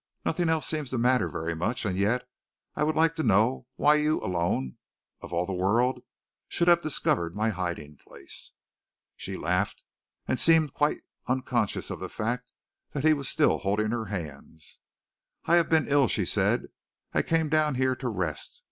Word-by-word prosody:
Nothing 170 0 0
else 160 -4 +1
seems 155 -4 -1
to 130 - -2
matter 125 +2 +2
very 80 +1 -3
much, 110 +10 -2
and 95 -3 -1
yet, 115 +6 0 0.5
I - - 0
would 155 +1 +1
like 165 0 +3
to - - 0
know 115 +1 +2
why 150 - +4
you 150 +1 +1
alone, 85 -8 -1 0.4
of - - -9
all 85 +1 0
the 95 - -4
world, 115 +8 +1 0.5
should 170 - 0
have 170 -1 +6
discovered 85 - 0
my 110 +2 +1
hiding 85 -6 -5
place." - - -11 0.6
She - - -6
laughed, 90 +3 -1 0.4
and 130 - 0
seemed 160 -4 +4
quite 150 0 0 0.2
unconscious 125 -4 -1
of - - -5
the - - -5
fact 125 +3 -3 0.4
that 140 - -3
he 155 0 +6
was 140 -3 -2
still 155 -1 +2
holding 105 +2 0
her 115 -2 -2
hands. 80 -5 -7 0.7
"I 170 - +5
have 170 - +2
been 160 -2 +3
ill," 140 -2 +4
she - - 0
said. - - +1 0.4
"I - - +3
came 160 -1 +1
down 155 -2 +2
here 130 0 +1
to 125 -1 -3
rest. 90 -8 -4
125 Hz, 175 wpm, -27 LUFS, 95-150 Hz, 0.7 s, have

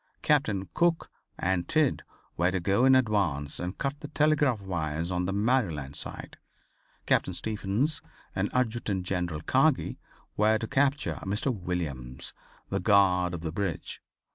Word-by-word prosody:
Captains 135 - +2
Cook 170 -1 +1 0.3
and 90 -1 0
Tidd 155 -4 +2 0.3
were 90 +2 +2
to 95 0 -1
go 100 +8 +2
in 130 0 +7
advance 100 - +1
and 90 +2 -4
cut 140 +1 -2
the 145 - -7
telegraph 150 -5 +2
wires 85 -3 -3
on 90 0 0
the - - -1
Maryland 100 - 0
side. - - -2 0.7
Captain 95 - +1
Stephens 110 - -1 0.3
and - - 0
Adjutant 115 -6 -1
General 90 -4 -2
Kagi - - +2 0.4
were 110 +1 +4
to 115 - -4
capture 140 +2 +1
Mr. 105 +7 0
Williams, 80 -10 -4 0.4
the - - 0
guard 90 -3 +3
of 85 - -6
the 80 -2 -3
bridge. 90 -2 -3
100 Hz, 140 wpm, -28 LUFS, 90-130 Hz, 0.7 s, in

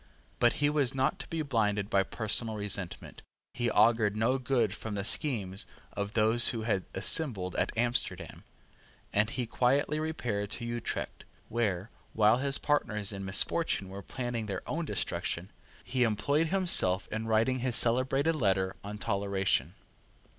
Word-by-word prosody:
But 120 -1 +4
he 145 - +1
was 145 -4 +1
not 135 0 0
to - - -6
be 165 -1 -3
blinded 105 -7 0
by 100 -2 +2
personal 110 +2 -1
resentment 100 -3 -1 0.3
he 120 -1 -1
augured 110 -2 +3
no 120 +5 +1
good 125 -5 +1
from 105 0 -6
the 100 - -2
schemes 100 -6 -1 0.3
of 100 +1 -4
those 115 +2 +4
who 115 -2 +1
had 100 -5 -1
assembled 100 - +2
at - - 0
Amsterdam; 95 -8 -1 0.7
and 105 +2 +2
he 125 +1 -3
quietly 140 +6 +1
repaired 120 -10 -3
to 120 - -6
Utrecht, 120 0 -4 0.3
where, 105 -4 -1 0.2
while 110 +1 +4
his 140 +1 0
partners 105 -8 -1
in 100 0 -6
misfortune 95 - 0
were 100 +1 -7
planning 120 -1 -4
their 100 - -4
own 165 +1 -2
destruction, 90 - -3 0.3
he 130 -1 -2
employed 125 +8 +1
himself 165 - +3
in 110 +1 -3
writing 115 +4 +2
his 125 -1 -1
celebrated 130 +7 +4
letter 95 -9 0
on 105 +1 -6
Toleration. 100 - -1
110 Hz, 150 wpm, -30 LUFS, 100-130 Hz, 0.7 s, But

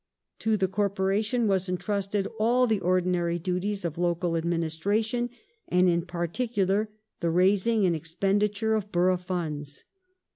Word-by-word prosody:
To 220 -1 +1
the 190 -1 +1
corporation 205 +4 0
was 190 -2 +1
entrusted 200 +2 -1
all 240 +3 +4
the 220 -4 +1
ordinary 180 -1 +1
duties 185 +3 -2
of 165 0 -3
local 175 -1 0
administration, 175 +9 0 0.4
and 180 +1 +3
in 170 0 +1
particular 195 +3 -1 0.3
the 170 - 0
raising 195 +5 +3
and 175 -2 +2
expenditure 200 +7 0
of 210 -2 -2
borough 180 +1 +3
funds. 155 -6 -5
190 Hz, 125 wpm, -27 LUFS, 175-210 Hz, 0.4 s, all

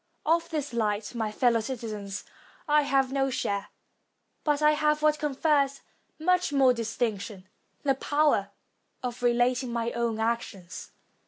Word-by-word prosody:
Of 335 +1 +2
this 295 -5 -3
light, 215 -1 -1
my 220 -3 -2
fellow 235 +1 +3
citizens, 215 -4 -5 0.4
I 300 0 +5
have 270 -2 +1
no 270 0 +1
share, 200 -5 -2 0.8
but 295 -2 +2
I 300 0 +5
have 300 0 +1
what 305 0 +3
confers 280 -1 +1 0.4
much 360 +1 +2
more 270 -3 +5
distinction, 220 -4 -3 0.4
the 275 -2 +3
power 290 -7 +1 0.5
of 245 -1 -4
relating 245 +1 +2
my 235 0 -1
own 235 -2 -1
actions. 220 -6 -3
250 Hz, 135 wpm, -28 LUFS, 225-295 Hz, 0.8 s, I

